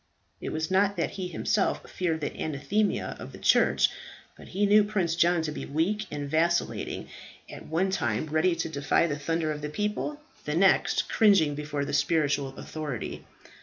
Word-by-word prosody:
It -, -, -4 dB
was 160 Hz, +2 st, -3 dB
not 200 Hz, +1 st, +3 dB
that -, -, -1 dB
he 190 Hz, -2 st, -4 dB
himself 195 Hz, +4 st, 0 dB
feared 165 Hz, -3 st, -2 dB
the 145 Hz, -, -3 dB
anathema 160 Hz, +8 st, -1 dB
of -, -, -8 dB
the -, -, -9 dB
church; -, -, +4 dB, 0.5 s
but -, -, -13 dB
he 205 Hz, +2 st, 0 dB
knew 210 Hz, +1 st, +6 dB
Prince 200 Hz, -5 st, 0 dB
John 170 Hz, 0 st, +3 dB
to 155 Hz, -, -2 dB
be -, -, -6 dB
weak 190 Hz, +9 st, -1 dB
and 145 Hz, -1 st, -4 dB
vacillating, 170 Hz, +4 st, 0 dB, 0.4 s
at -, -, -10 dB
one 180 Hz, +5 st, 0 dB
time 120 Hz, -, 0 dB
ready 155 Hz, +3 st, +2 dB
to 165 Hz, -, -2 dB
defy 145 Hz, +1 st, +1 dB
the 150 Hz, -3 st, -2 dB
thunder 160 Hz, +1 st, -1 dB
of 150 Hz, -1 st, -5 dB
the 150 Hz, -, -4 dB
pope, 210 Hz, -, -2 dB, 0.3 s
the 150 Hz, -, -2 dB
next 190 Hz, +3 st, +3 dB
cringing 195 Hz, -9 st, +4 dB
before 145 Hz, -1 st, -3 dB
the -, -, -5 dB
spiritual 145 Hz, -2 st, +1 dB
authority. 150 Hz, -8 st, -5 dB
160 Hz, 175 wpm, -27 LUFS, 150-190 Hz, 0.5 s, knew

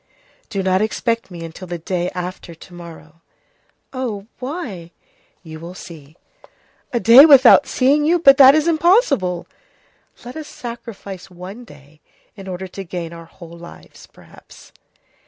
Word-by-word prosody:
"Do 195 Hz, -2 st, -3 dB
not 185 Hz, +1 st, +1 dB
expect 230 Hz, +1 st, -2 dB
me 170 Hz, -2 st, -9 dB
until 165 Hz, +3 st, -10 dB
the 175 Hz, 0 st, -5 dB
day 175 Hz, +1 st, -3 dB
after 180 Hz, -1 st, -7 dB
to 175 Hz, -, -16 dB
morrow." 165 Hz, -2 st, -13 dB, 0.7 s
"Oh! 230 Hz, -7 st, -5 dB
Why?" 250 Hz, -, -7 dB, 0.5 s
"You 160 Hz, -2 st, -10 dB
will 170 Hz, +3 st, -10 dB
see." 155 Hz, -3 st, -13 dB, 0.7 s
"A 240 Hz, -, -1 dB
day 235 Hz, +4 st, +8 dB
without 280 Hz, -2 st, +7 dB
seeing 280 Hz, +3 st, +2 dB
you! 335 Hz, +4 st, +2 dB
But 275 Hz, -5 st, +6 dB
that 270 Hz, +1 st, +8 dB
is 310 Hz, +1 st, +1 dB
impossible!" 315 Hz, -, +1 dB, 0.8 s
"Let 245 Hz, -, -9 dB
us 310 Hz, -1 st, -8 dB
sacrifice 200 Hz, -6 st, -9 dB
one 190 Hz, +7 st, -11 dB
day 145 Hz, -, -19 dB, 0.3 s
in 195 Hz, -2 st, -11 dB
order 185 Hz, 0 st, -6 dB
to 195 Hz, +2 st, -8 dB
gain 170 Hz, -2 st, -7 dB
our 165 Hz, 0 st, -11 dB
whole 170 Hz, 0 st, -14 dB
lives, 170 Hz, 0 st, -14 dB
perhaps." -, -, -18 dB
190 Hz, 145 wpm, -19 LUFS, 170-255 Hz, 0.8 s, day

